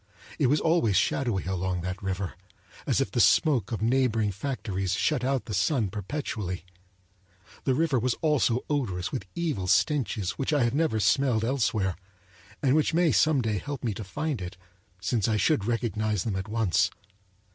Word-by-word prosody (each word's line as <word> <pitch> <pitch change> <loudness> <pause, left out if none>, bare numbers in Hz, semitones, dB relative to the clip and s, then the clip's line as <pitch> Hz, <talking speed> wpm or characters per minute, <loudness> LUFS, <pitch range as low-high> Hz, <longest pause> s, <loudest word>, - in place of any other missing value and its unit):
It - - +4
was 145 +4 +3
always 160 - +2
shadowy 120 -5 +1
along 95 -1 -2
that 90 +2 -4
river, 95 -1 -3 0.5
as - - +2
if - - -1
the - - -1
smoke 130 - +4
of 110 -1 -2
neighboring 115 -3 +2
factories 100 -4 -3
shut 130 +5 +1
out 135 0 0
the 110 - -5
sun 105 - +1
perpetually. 105 -4 -4 1.0
The 130 - +2
river 150 -3 +2
was 125 +1 0
also 140 -6 +1
odorous 105 -11 -1
with 95 - -4
evil 155 - -2
stenches 115 - +1
which 135 +3 0
I 145 -4 +3
have 120 0 +1
never 150 -7 +1
smelled 110 +2 +2
elsewhere, 110 -7 0 0.7
and 135 -2 +4
which 155 +1 +2
may 170 -2 +4
some 155 -5 +3
day 105 -3 0
help 145 +3 -6
me 115 -4 0
to 110 - -6
find 145 - -3
it, 90 0 -7 0.4
since 100 +3 0
I 110 -1 +1
should 110 -3 +2
recognize 110 -4 -1
them 110 -4 -2
at 95 +1 -3
once. 110 -6 +2
115 Hz, 170 wpm, -27 LUFS, 95-140 Hz, 1.0 s, It